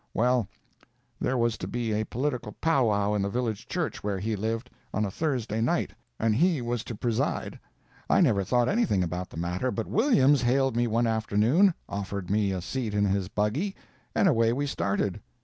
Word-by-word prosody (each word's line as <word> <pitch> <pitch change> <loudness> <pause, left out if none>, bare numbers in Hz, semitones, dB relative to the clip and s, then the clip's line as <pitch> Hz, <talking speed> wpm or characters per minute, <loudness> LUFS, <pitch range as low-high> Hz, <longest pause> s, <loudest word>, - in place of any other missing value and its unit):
Well, 125 -2 +2 0.7
there 130 - 0
was 115 -2 +1
to - - -4
be 120 -2 -2
a 110 +1 0
political 125 -4 -3
pow 160 -7 +2
wow 105 0 +1
in 105 - +1
the 100 - 0
village 115 -2 -2
church - - -3
where 100 -1 -1
he 110 +3 -2
lived, 115 +4 -3 0.2
on 105 +1 +1
a 100 - -4
Thursday 120 -6 -1
night, 115 - +1 0.3
and 115 -1 +2
he 165 +3 +3
was 120 -1 -2
to 115 - -5
preside. 115 +1 -2 0.5
I - - +4
never 115 - +3
thought 120 +4 +2
anything 200 - +2
about 90 +1 -4
the - - -11
matter, 90 +9 -1
but 115 -3 -2
Williams 145 - +4
hailed 130 +1 +2
me 120 0 +2
one 115 +1 +1
afternoon, 115 - +3
offered 100 -1 -4
me 100 -1 +2
a 95 -1 -2
seat 115 -1 -3
in 105 0 +3
his 95 -1 0
buggy, 125 - -1 0.4
and - - +4
away 115 -8 +3
we 140 +3 -1
started. 100 -6 -1
115 Hz, 190 wpm, -27 LUFS, 105-130 Hz, 0.7 s, I